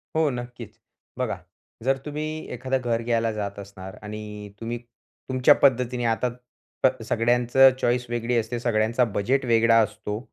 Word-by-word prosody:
हो 160 -1 +3
नक्कीच. 120 -3 -7 0.4
बघा, - - -1 0.5
जर 135 +2 +2
तुम्ही 155 +1 -4
एखादं 130 +2 -1
घर 115 -2 0
घ्यायला 115 -1 +1
जात 100 -2 -4
असणार 95 -1 -9
आणि 105 -1 -7
तुम्ही 115 +1 -3 0.5
तुमच्या 130 +2 +6
पद्धतीने 125 -2 +3
आता 115 +2 +1 0.5
प - - +8 0.2
सगळ्यांचं 120 +3 +4
चॉईस 125 +1 +1
वेगळी 120 0 -1
असते, 115 +2 -1
सगळ्यांचा 115 +1 +2
बजेट 130 +7 +1
वेगळा 115 -1 +4
असतो, 105 0 -4
120 Hz, 140 wpm, -25 LUFS, 110-125 Hz, 0.5 s, प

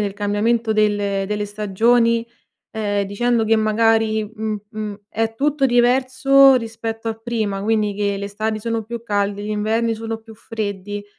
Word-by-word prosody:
del 200 -2 -2
cambiamento 220 +3 0
delle 205 -2 +1
delle 210 0 -1
stagioni, 230 +3 +2 0.4
ehm, 205 -2 -1
dicendo 230 +3 0
che 220 +1 +3
magari, 220 0 +2
mh 215 -1 -3
mhmm, 215 -2 -5 0.2
è 225 0 -1
tutto 285 +2 +1
diverso 260 +2 +5
rispetto 225 -1 -3
a 225 - -2
prima, 220 -3 -3
quindi 215 -1 +1
che 200 0 -1
le 200 - -5
estati 215 +2 -3
sono 230 +1 -2
più 230 +2 -7
calde, 205 -2 -1
gli 210 - -4
inverni 220 +2 0
sono 225 0 -4
più 225 0 -14
freddi; 205 -2 -5
220 Hz, 155 wpm, -20 LUFS, 205-230 Hz, 0.4 s, diverso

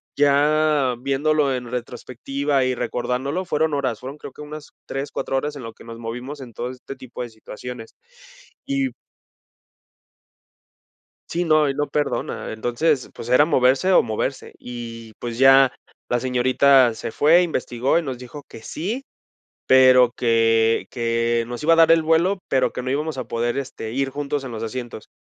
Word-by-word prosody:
ya 145 -1 +3
viéndolo 140 +2 +1
en 125 -1 -6
retrospectiva 130 +3 -2
y 130 0 0
recordándolo, 125 +7 -2
fueron 160 -3 0
horas, 130 -6 -1
fueron 135 +4 -8
creo - - -9
que 150 - -11
unas 150 0 -9 0.2
3, 135 +1 -4
4 135 - -2
horas 150 +2 -3
en 140 - -8
lo 115 -1 -8
que - - -16
nos 115 0 -9
movimos 125 +5 -6
en 125 -4 -10
todo 120 +3 -4
este 130 +2 -9
tipo 130 -2 -8
de 120 - -7
situaciones, 115 +1 -9 0.7
y 275 -1 -1 2.4
Sí, 175 +1 -1
no, 155 -2 +4
y 135 - -1
no 145 +1 -1
perdona, 150 -1 -2
entonces, 120 +6 0
pues, 115 - -8
era 125 +4 +6
moverse 135 +4 +3
o 185 - +6
moverse, 120 +4 -3
y, 115 -2 -8
pues, 120 -1 -5
ya 135 -1 +6 0.4
la 120 - +1
señorita 130 0 +4
se 110 - -6
fue, 165 +4 +5
investigó 130 -5 0
y 170 - 0
nos 130 -4 -4
dijo 130 +4 -10
que 110 - -12
sí, 220 - -4 0.6
pero 130 -2 +6
que 115 -2 +2
que 115 -1 0
nos 120 +3 -6
iba 165 +2 +4
a - - +5
dar 165 0 +6
el 165 -1 +4
vuelo, 170 +5 +2
pero 130 - +1
que - - -5
no 130 - -3
íbamos 150 +3 -2
a 130 - -4
poder, 120 +1 -1
este, 130 -5 -6
ir 135 +1 -1
juntos 145 0 -3
en 130 - -6
los 110 - -6
asientos, 120 -1 -6
130 Hz, 170 wpm, -22 LUFS, 120-150 Hz, 2.4 s, era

